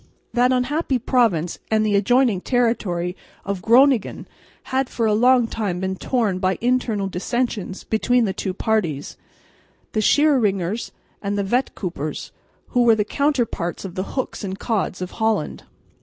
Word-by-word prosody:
That 250 Hz, +1 st, +3 dB
unhappy 260 Hz, +2 st, 0 dB
province 220 Hz, -9 st, +1 dB
and 215 Hz, 0 st, +2 dB
the 210 Hz, -1 st, +2 dB
adjoining 225 Hz, 0 st, +3 dB
territory 195 Hz, -8 st, 0 dB, 0.3 s
of 195 Hz, -2 st, -3 dB
Groningen 250 Hz, +1 st, +3 dB, 0.5 s
had 265 Hz, 0 st, +1 dB
for 230 Hz, -, -1 dB
a 215 Hz, -, +3 dB
long 245 Hz, +2 st, +4 dB
time 205 Hz, -6 st, -3 dB
been 190 Hz, 0 st, -2 dB
torn 210 Hz, -3 st, 0 dB
by 185 Hz, 0 st, 0 dB
internal 240 Hz, -4 st, 0 dB
dissensions 200 Hz, +1 st, -3 dB
between 245 Hz, +2 st, +2 dB
the 195 Hz, -, -1 dB
two 190 Hz, -, -3 dB
parties, 180 Hz, -11 st, -1 dB, 0.8 s
the 215 Hz, -, 0 dB
Schieringers 220 Hz, -, +2 dB, 0.3 s
and 200 Hz, 0 st, -2 dB
the 200 Hz, -, 0 dB
Vetkoopers, 190 Hz, -, -3 dB, 0.4 s
who 245 Hz, -, +2 dB
were 235 Hz, -2 st, +5 dB
the 210 Hz, -1 st, 0 dB
counterparts 240 Hz, -, -1 dB
of 185 Hz, -, -6 dB
the 185 Hz, +8 st, -5 dB
Hooks 260 Hz, -, -3 dB
and 190 Hz, -1 st, -4 dB
Cods 200 Hz, -5 st, -2 dB
of 180 Hz, -, -6 dB
Holland. 220 Hz, -7 st, -1 dB
220 Hz, 145 wpm, -22 LUFS, 190-245 Hz, 0.8 s, were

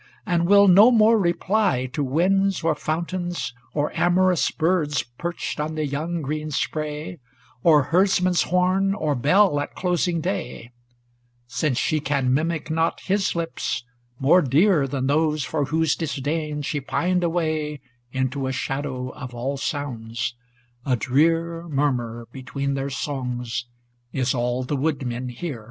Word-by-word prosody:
And 170 Hz, -1 st, +1 dB
will 200 Hz, +1 st, +7 dB
no 200 Hz, +6 st, +8 dB
more 225 Hz, -1 st, +5 dB
reply 180 Hz, -, +1 dB
to 145 Hz, -, -1 dB
winds 190 Hz, +8 st, +1 dB
or 165 Hz, -1 st, +3 dB
fountains, 175 Hz, 0 st, -3 dB, 0.2 s
Or 150 Hz, 0 st, 0 dB
amorous 180 Hz, 0 st, +3 dB
birds 160 Hz, -3 st, 0 dB, 0.2 s
perched 170 Hz, -2 st, -4 dB
on 155 Hz, +1 st, -2 dB
the 155 Hz, -1 st, -1 dB
young 155 Hz, +4 st, -3 dB
green 155 Hz, +2 st, -3 dB
spray, 150 Hz, +2 st, -3 dB, 0.4 s
Or 150 Hz, -2 st, +5 dB
herdsman's 180 Hz, +2 st, +2 dB
horn, 185 Hz, +2 st, +2 dB
or 155 Hz, -7 st, 0 dB
bell 150 Hz, -, +3 dB
at 145 Hz, -, -5 dB
closing 175 Hz, -1 st, 0 dB
day; 125 Hz, -8 st, -4 dB, 0.7 s
Since 130 Hz, +2 st, -1 dB
she 155 Hz, +4 st, +1 dB
can 135 Hz, -3 st, 0 dB
mimic 160 Hz, +2 st, -1 dB
not 165 Hz, +1 st, 0 dB
his 195 Hz, -1 st, 0 dB
lips, 165 Hz, -8 st, -2 dB, 0.3 s
more 150 Hz, +8 st, +5 dB
dear 150 Hz, +2 st, +3 dB
Than 130 Hz, -1 st, -2 dB
those 150 Hz, +1 st, +1 dB
for 145 Hz, 0 st, -1 dB
whose 160 Hz, +2 st, +1 dB
disdain 150 Hz, 0 st, -3 dB
she 145 Hz, 0 st, -2 dB
pined 180 Hz, +6 st, 0 dB
away 155 Hz, -3 st, -1 dB, 0.3 s
Into 130 Hz, +1 st, -1 dB
a -, -, -1 dB
shadow 135 Hz, -1 st, -3 dB
of 125 Hz, -3 st, -9 dB
all 130 Hz, +4 st, -2 dB
sounds: 120 Hz, -5 st, -3 dB, 0.5 s
ŌĆö 135 Hz, -, -2 dB
a -, -, +5 dB
drear 165 Hz, +7 st, +1 dB
Murmur, 125 Hz, -6 st, -1 dB
between 140 Hz, +1 st, -3 dB
their 135 Hz, 0 st, -2 dB
songs, 125 Hz, -4 st, -3 dB, 0.5 s
is 130 Hz, -2 st, 0 dB
all 125 Hz, 0 st, -1 dB
the 135 Hz, +3 st, -2 dB
woodmen 130 Hz, -4 st, -2 dB
hear. 125 Hz, +1 st, -5 dB
150 Hz, 140 wpm, -23 LUFS, 135-175 Hz, 0.7 s, no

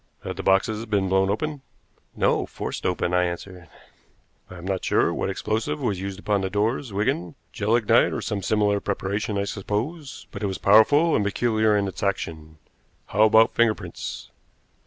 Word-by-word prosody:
"Had 95 Hz, -, -5 dB
the 95 Hz, -, -5 dB
boxes 100 Hz, +3 st, +1 dB
been 100 Hz, -3 st, 0 dB
blown 95 Hz, 0 st, +2 dB
open?" 145 Hz, +7 st, -2 dB, 0.5 s
"No; -, -, +1 dB
forced -, -, -4 dB
open," 90 Hz, -1 st, -1 dB
I 90 Hz, 0 st, +3 dB
answered. 90 Hz, 0 st, -7 dB, 0.8 s
"I 95 Hz, -, -10 dB
am 85 Hz, -, -10 dB
not 95 Hz, -1 st, -2 dB
sure -, -, +2 dB
what -, -, -2 dB
explosive 110 Hz, -8 st, -2 dB
was 95 Hz, -3 st, -2 dB
used 95 Hz, 0 st, -5 dB
upon 100 Hz, 0 st, 0 dB
the 95 Hz, -, -2 dB
doors, 110 Hz, +5 st, -1 dB
Wigan 95 Hz, -4 st, -1 dB, 0.2 s
gelignite 110 Hz, +1 st, +3 dB
or -, -, -3 dB
some 100 Hz, -2 st, -3 dB
similar 105 Hz, +1 st, +1 dB
preparation, 100 Hz, +1 st, -2 dB
I 100 Hz, -, 0 dB
suppose 115 Hz, -, -4 dB
but 100 Hz, -, -8 dB
it 105 Hz, -, 0 dB
was 95 Hz, -, -3 dB
powerful 145 Hz, +11 st, +5 dB
and 105 Hz, -, +2 dB
peculiar 110 Hz, 0 st, +1 dB
in 100 Hz, -1 st, 0 dB
its 95 Hz, -, -7 dB
action. 80 Hz, -5 st, -3 dB, 0.5 s
How 105 Hz, +2 st, +4 dB
about 110 Hz, +1 st, +5 dB
finger 115 Hz, -2 st, +3 dB
prints?" 90 Hz, -4 st, -8 dB
100 Hz, 175 wpm, -24 LUFS, 95-110 Hz, 0.8 s, powerful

